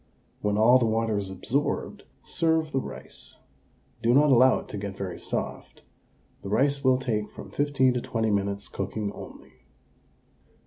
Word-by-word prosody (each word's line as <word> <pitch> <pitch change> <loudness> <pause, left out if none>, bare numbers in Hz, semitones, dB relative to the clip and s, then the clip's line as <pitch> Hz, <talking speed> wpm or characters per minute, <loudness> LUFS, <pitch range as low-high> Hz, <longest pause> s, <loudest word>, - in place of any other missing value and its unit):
When 105 0 0
all 120 +4 +6
the 120 - +2
water 110 0 0
is 100 -2 -2
absorbed, 125 +10 -2 0.2
serve 160 -1 0
the 135 - +1
rice. 65 - -10 0.6
Do 120 +1 +3
not 145 +1 +5
allow 130 +1 +6
it - - -8
to 105 - -5
get 100 -1 -6
very 95 -3 -5
soft; - - -5 0.6
the 100 - -7
rice 140 +6 +1
will 130 -1 +4
take 110 -5 -2
from - - -11
15 140 -3 +2
to 125 - -1
20 110 -2 -1
minutes' 100 0 -1
cooking 100 +1 -4
only. - - -11
115 Hz, 160 wpm, -26 LUFS, 100-130 Hz, 0.6 s, all